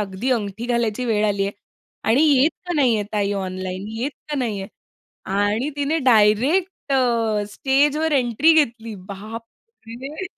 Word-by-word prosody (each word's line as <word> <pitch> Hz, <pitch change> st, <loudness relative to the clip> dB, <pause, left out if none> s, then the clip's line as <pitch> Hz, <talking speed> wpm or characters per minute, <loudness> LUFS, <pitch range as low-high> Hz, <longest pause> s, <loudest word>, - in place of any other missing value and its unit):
अगदी 205 Hz, +5 st, -3 dB
अंगठी 220 Hz, -1 st, -2 dB
घालायची 235 Hz, -1 st, 0 dB
वेळ 215 Hz, -3 st, +1 dB
आली 200 Hz, -1 st, 0 dB
आहे. 200 Hz, -, -4 dB, 0.5 s
आणि 240 Hz, +7 st, +3 dB
येत 290 Hz, 0 st, +4 dB, 0.2 s
का 355 Hz, -, -2 dB
नाही 265 Hz, -6 st, +3 dB
आहे 210 Hz, -, -2 dB
ताई 205 Hz, -1 st, 0 dB
ऑनलाईन, 185 Hz, 0 st, -4 dB
येत 270 Hz, +4 st, -1 dB, 0.2 s
का 295 Hz, -, -1 dB
नाहीये. 210 Hz, -6 st, -2 dB, 0.6 s
आणि 205 Hz, +7 st, 0 dB
तिने 290 Hz, +3 st, 0 dB
डायरेक्ट 255 Hz, -, +3 dB
अ, 230 Hz, -5 st, +1 dB
स्टेजवर 290 Hz, +6 st, +1 dB
एंट्री 265 Hz, +4 st, +3 dB
घेतली. 230 Hz, -7 st, +1 dB
बापरे! 230 Hz, -, -9 dB
230 Hz, 140 wpm, -21 LUFS, 205-275 Hz, 0.6 s, येत